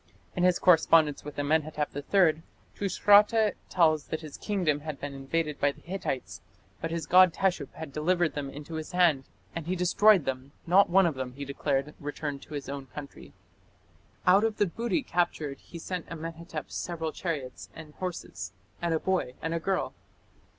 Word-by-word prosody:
In 180 - -1
his 180 -1 +4
correspondence 160 -4 +4
with 150 0 -9
Amenhotep 150 0 0
III 160 +2 +3 0.3
Tushratta 205 +2 +4 0.2
tells 155 -4 +3
that 160 - -4
his 155 -3 -9
kingdom 180 -8 0
had 150 -1 -6
been 145 -1 -5
invaded 150 +2 -2
by 145 - +3
the - - -18
Hittites, 175 -8 -4 0.4
but 165 - -2
his 165 -2 -3
god 185 +3 +7
Teshup 180 -7 0
had 160 -3 -8
delivered 170 +2 +1
them 145 -2 -4
into 145 +4 -9
his 160 +2 -5
hand, 165 -7 +3 0.3
and 165 -1 -5
he 185 - 0
destroyed 185 0 +4
them; 135 +1 -4
"not 185 +3 +5
one 190 +2 +5
of 165 - +1
them", 130 -2 -5
he 140 +2 -6
declared, 140 +1 -1
"returned 145 -1 -4
to 150 - -9
his 140 - -5
own 140 -1 -6
country". 140 +2 -10 0.9
Out 190 +3 +6
of 225 -1 0
the 205 - +3
booty 235 - -1
captured 160 -5 -1
he 170 - -11
sent 180 +1 -5
Amenhotep 165 -1 -6
several 165 -2 -3
chariots 145 -9 -5
and 155 -2 -11
horses, 95 - -5 0.3
and 170 -1 +1
a - - 0
boy 185 -9 -1
and 165 +1 -3
a 165 - 0
girl. 190 +3 -1
160 Hz, 175 wpm, -28 LUFS, 145-180 Hz, 0.9 s, god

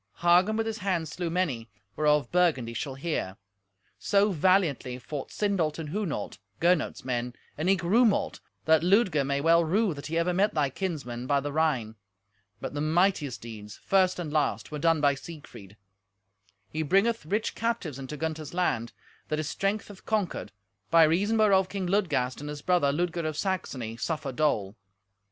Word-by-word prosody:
Hagen 180 +5 +4
with 225 - 0
his 225 0 -3
hand 185 -5 -1
slew 170 +3 -4
many, 150 -11 -1 0.3
whereof 150 -1 +2
Burgundy 155 -10 +2
shall 130 +3 -4
hear. 135 - -3 0.6
So 200 +1 +3
valiantly 165 -8 +2
fought 140 +2 -6
Sindolt 185 -7 0
and 160 -3 -5
Hunolt, 160 - -3 0.2
Gernot's 170 -5 +1
men, 125 -1 -2 0.2
and 160 +5 -1
eke 190 -3 +2
Rumolt, 215 +4 +2 0.3
that 160 0 +5
Ludger 180 -4 +3
may 140 +1 -1
well 165 +2 +5
rue 195 +4 +1
that 140 0 -8
he 165 +1 -2
ever 170 +2 +1
met 200 +4 +2
thy 145 -3 +1
kinsmen 130 -9 -4
by 140 0 +3
the 145 +1 -4
Rhine. 130 -9 0 0.6
But - - -5
the 145 - -3
mightiest 155 -4 +1
deeds, 105 -3 -9
first 185 -1 +3
and 160 -4 -5
last, 150 0 0
were 150 - -4
done 165 0 +2
by 145 -1 +4
Siegfried. 135 - -11 0.9
He 155 - -2
bringeth 195 +9 +2
rich 210 +5 -1
captives 225 - -2
into 135 +3 -6
Gunther's 160 0 -4
land, 120 -10 0 0.3
that 155 - -1
his 155 -1 -2
strength 200 +5 -1
hath 205 -2 -14
conquered, 205 - -1 0.4
by 165 -1 +7
reason 195 +8 +2
whereof 195 -4 +4
King 195 -2 -3
Ludgast 175 -10 0
and 145 +1 -6
his 150 -1 -7
brother, 175 -6 +3
Ludger 170 +1 -1
of 155 -1 -4
Saxony, 130 - -3
suffer 150 0 -3
dole. 115 -8 0
160 Hz, 170 wpm, -28 LUFS, 140-185 Hz, 0.9 s, by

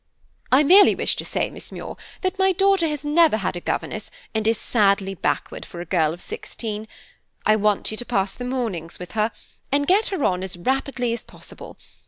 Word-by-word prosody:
"I 265 +4 +6
merely 380 +7 +7
wish - - +1
to - - -3
say, - - -1
Miss - - -11
Muir, - - -7 0.3
that 375 +1 -1
my 380 0 +4
daughter 390 -2 +3
has 300 -2 -4
never 310 -4 +4
had 195 -4 -2
a - - -3
governess - - -3 0.2
and 220 -1 0
is 225 0 +3
sadly 200 -4 +2
backward 190 - -2
for 170 - -10
a 175 - -5
girl 160 -3 +2
of 175 - -8
sixteen. 220 - -6 0.6
I 215 - +5
want 210 -1 +1
you 215 - -5
to 245 - -3
pass 195 -5 0
the 245 - -7
mornings 225 -11 -3
with 180 - -9
her, 215 +1 +1 0.4
and 285 +1 +2
get 395 +7 +3
her 380 -8 -2
on 180 -1 +1
as 190 -2 -5
rapidly 255 +3 -1
as 235 - -4
possible. - - -11
230 Hz, 205 wpm, -23 LUFS, 195-295 Hz, 0.6 s, merely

